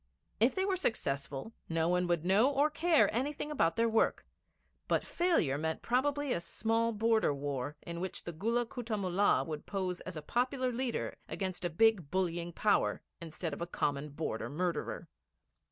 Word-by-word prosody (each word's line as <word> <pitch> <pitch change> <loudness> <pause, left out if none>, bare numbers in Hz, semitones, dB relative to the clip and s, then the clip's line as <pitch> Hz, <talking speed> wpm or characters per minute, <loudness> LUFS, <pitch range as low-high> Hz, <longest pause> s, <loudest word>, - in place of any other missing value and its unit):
If 235 +5 +4
they 380 0 +1
were 385 -1 +1
successful, 140 - -2 0.2
no 165 0 +1
one 180 0 +2
would 175 -1 0
know 205 +8 +5
or 285 +2 +2
care 325 +1 +3
anything 290 +4 -2
about 165 - +2
their 230 0 +3
work; 225 0 +2 0.6
but - - +2
failure 330 - +1
meant 160 0 -2
probably 280 +2 +1
a - - 0
small 225 +6 0
border 225 -3 +2
war, 140 0 -3
in 170 0 -5
which 185 0 -4
the 170 - -5
Gulla 230 +8 0
Kutta 230 -2 -4
Mullah 185 -6 +2
would 150 +1 -6
pose 185 -3 -2
as 185 -3 -7
a 155 - -6
popular 255 - 0
leader 245 0 -2
against 185 -2 -3
a - - +1
big 190 -2 +3
bullying 175 -1 -1
power, 205 +4 +1 0.2
instead 160 -1 -4
of 145 - -6
a 170 - -2
common 145 -3 -1
border 130 -6 -3
murderer. 170 +1 -2
190 Hz, 170 wpm, -33 LUFS, 165-240 Hz, 0.6 s, know